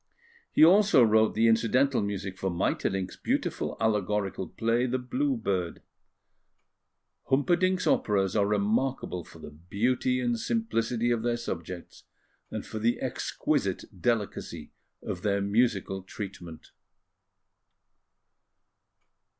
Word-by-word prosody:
He - - +7
also 195 -6 +6
wrote 110 0 +4
the 115 +1 +4
incidental 120 +4 +3
music 100 -2 -3
for 95 - -1
Maeterlinck's 95 +2 -1
beautiful - - -2
allegorical 105 -3 0
play, 115 +2 0
The 130 +1 0
Blue 260 - -1
Bird. 90 - -2 1.4
Humperdinck's 180 +7 +2
operas 95 -3 +1
are 100 -2 +3
remarkable 105 -1 0
for - - -15
the - - -10
beauty 120 +11 0
and 120 -2 0
simplicity 120 - 0
of 115 -2 +1
their 120 0 0
subjects, 90 -6 -7 0.4
and - - -5
for 110 - -6
the 115 +2 +1
exquisite - - -1 0.2
delicacy 110 -1 -2 0.3
of 90 - -4
their 100 0 +1
musical 100 -2 +1
treatment. 95 -4 -9
110 Hz, 110 wpm, -28 LUFS, 95-125 Hz, 1.4 s, He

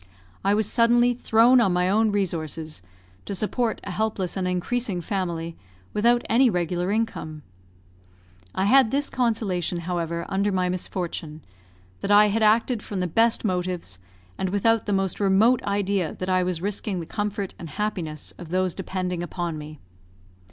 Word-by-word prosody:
I 200 +1 +3
was 215 0 +1
suddenly 240 +2 +4
thrown 240 +1 +4
on 195 -6 +2
my 180 0 +2
own 215 +3 +3
resources, 160 - -3 0.4
to 200 - -4
support 220 +4 -1
a 195 - -5
helpless 200 -3 -2
and 185 -2 -1
increasing 185 +2 -1
family, 170 -4 -3 0.4
without 240 +3 +3
any 245 +3 +4
regular 180 -1 -1
income. 200 -8 -2 1.1
I 190 - +1
had 260 +2 +5
this 280 +4 -1
consolation, 200 -8 0
however, 170 -1 -3
under 200 +2 0
my 185 -1 +1
misfortune, 170 -4 -4 0.5
that - - -4
I 210 +1 +6
had 220 +2 0
acted 220 +2 +3
from 200 -2 -5
the 180 - 0
best 225 +7 +2
motives, 180 - -2 0.4
and 190 - 0
without 220 +3 +2
the 205 - +1
most 195 -2 -1
remote 205 +5 +4
idea 200 -4 0
that 185 - -4
I 185 0 +3
was 180 -1 -2
risking 200 -1 -2
the 165 - -5
comfort 205 0 -3
and 165 - -7
happiness 170 -5 -3
of 175 - -9
those 185 0 0
depending 185 -2 -3
upon 175 -1 -3
me. 155 0 -8
190 Hz, 160 wpm, -24 LUFS, 175-220 Hz, 1.1 s, I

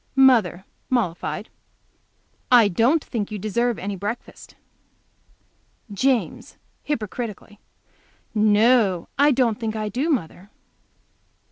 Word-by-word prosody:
Mother, 225 -9 +4 0.2
mollified. 215 -3 -2 1.0
"I 240 -4 +7
don't 245 - +2
think 215 -5 -4
you 215 - -5
deserve 230 +3 -1
any 200 +1 -4
breakfast." 205 +5 -7 1.4
James, 255 +3 -1 0.2
hypocritically. 215 -5 -5 0.7
"No, 215 -3 +3
I 290 +1 +6
don't 245 -4 +1
think 220 -2 -3
I 215 -1 -3
do, 260 - -2
mother." 195 - -3
220 Hz, 95 wpm, -22 LUFS, 205-250 Hz, 1.4 s, I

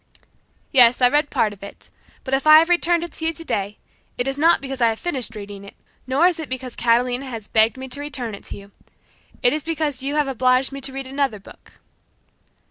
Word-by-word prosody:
"Yes, 245 -3 +6
I 250 -1 +6
read 295 +2 +1
part 210 -2 0
of 200 - -17
it, 200 - -11 0.3
but 265 - -5
if 270 +3 0
I 310 0 +10
have 330 +2 +4
returned 345 -1 +2
it 345 - -7
to 320 - -5
you - - +1
today, 210 - -4 0.4
it 245 - -1
is 270 - -1
not 325 +4 +3
because 270 -2 -6
I 230 - +5
have 220 - -3
finished 260 -9 -4
reading 200 -1 -9
it, 200 - -13 0.3
nor 270 +6 +2
is 355 -2 +2
it 315 - -6
because 255 -1 -6
Catalina 245 +3 +1
has 230 -5 -7
begged 220 +2 +2
me 260 0 -7
to 285 - -5
return 270 -6 -5
it 200 - -10
to - - -7
you. 200 0 -14 0.7
It 245 - +4
is 305 -1 -3
because 310 -4 -2
you 280 +2 -2
have 300 -2 +1
obliged 255 0 +2
me 275 0 -7
to 270 0 -3
read 270 0 -6
another 270 -4 -2
book." 195 - -17
265 Hz, 225 wpm, -21 LUFS, 235-295 Hz, 0.7 s, I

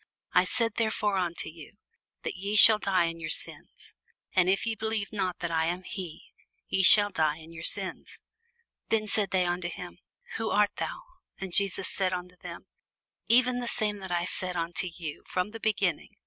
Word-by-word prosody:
I 180 - +4
said 230 +3 -1
therefore 215 -3 0
unto 175 -2 -2
you, 160 +4 -12 0.5
that - - -3
ye 200 +3 -4
shall 215 0 +10
die 190 -4 +1
in 165 0 -4
your 160 -1 -5
sins: - - -5 0.4
for 185 -1 +3
if 190 +2 +1
ye 230 - -1
believe 220 -1 -3
not 185 -4 -2
that 170 -1 -3
I 160 -1 +1
am 175 +2 -3
he, 180 -5 -8 0.3
ye 190 - 0
shall 205 +1 +8
die 155 -4 0
in 165 +1 -13
your 160 - -9
sins. 190 +2 -2 0.7
Then 220 -1 +1
said 210 -1 +1
they 185 -1 +1
unto 175 0 -2
him, - - -9 0.4
Who 225 - -2
art 205 0 +2
thou? - - -5 0.3
And 190 -2 -7
Jesus 195 0 +2
saith 185 -1 0
unto 180 0 -6
them, - - -10 0.6
Even 250 +1 +3
the 245 - -4
same 210 -3 -1
that 190 -2 -8
I 175 0 0
said 185 0 -4
unto 170 +2 -2
you 165 -3 -7
from 180 +2 -2
the 225 - -8
beginning. 200 -6 -1
185 Hz, 190 wpm, -28 LUFS, 175-210 Hz, 0.7 s, shall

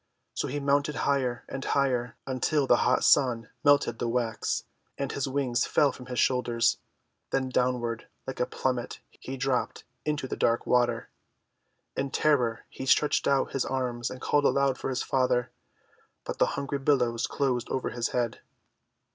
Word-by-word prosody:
So - - -2
he 145 +3 -3
mounted 145 +1 +1
higher 130 -4 0
and 135 - -5
higher, 125 -4 0
until 135 +2 +1
the 120 - +5
hot 125 +1 +2
Sun 120 -5 +3
melted 145 -5 +4
the 120 - -1
wax, 115 -2 -1 0.3
and 140 -1 -2
his 140 - -2
wings 130 -3 0
fell 145 -2 +3
from 125 0 -11
his 125 -1 -5
shoulders. 120 -2 +2 0.5
Then 130 -1 0
downward, 125 -2 -1 0.2
like 130 - -6
a 125 - +1
plummet, 125 -2 -2
he 135 +1 -8
dropped 130 -1 -1 0.2
into 150 -3 -2
the - - -3
dark 115 0 +1
water. 120 -2 +1 0.9
In 135 0 -1
terror 130 -6 +1
he 130 - -7
stretched 150 +3 +3
out 140 -1 +2
his 135 - 0
arms 125 -3 -2
and 130 - -8
called 145 +2 +1
aloud 140 -2 +2
for - - -3
his 130 - -1
father, 125 -2 +1 0.7
but - - -5
the - - +4
hungry 140 0 -2
billows 125 -4 +1
closed 125 -4 -1
over 130 - -2
his 120 0 -1
head. 120 -2 -1
130 Hz, 165 wpm, -28 LUFS, 120-140 Hz, 0.9 s, the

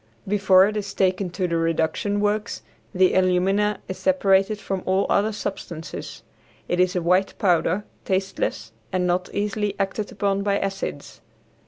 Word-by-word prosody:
Before 190 -2 +5
it 210 +1 -2
is 200 -2 -4
taken 185 0 +1
to 180 +1 -2
the 170 -1 0
reduction 165 +5 0
works 210 +1 -1 0.3
the 185 -2 +3
alumina 190 +3 +2
is 185 - -6
separated 200 -6 +3
from 195 -2 -4
all 190 +1 +2
other 210 +2 +2
substances. 185 -6 -6 0.4
It 175 - -1
is 185 +1 +2
a 180 - 0
white 185 +3 +2
powder, 185 +1 +1 0.2
tasteless, 190 - -2 0.2
and 185 -1 0
not 180 +1 0
easily 205 0 -1
acted 200 +1 -2
upon 200 0 0
by 200 0 +1
acids. 195 -1 -5
195 Hz, 150 wpm, -23 LUFS, 180-205 Hz, 0.4 s, Before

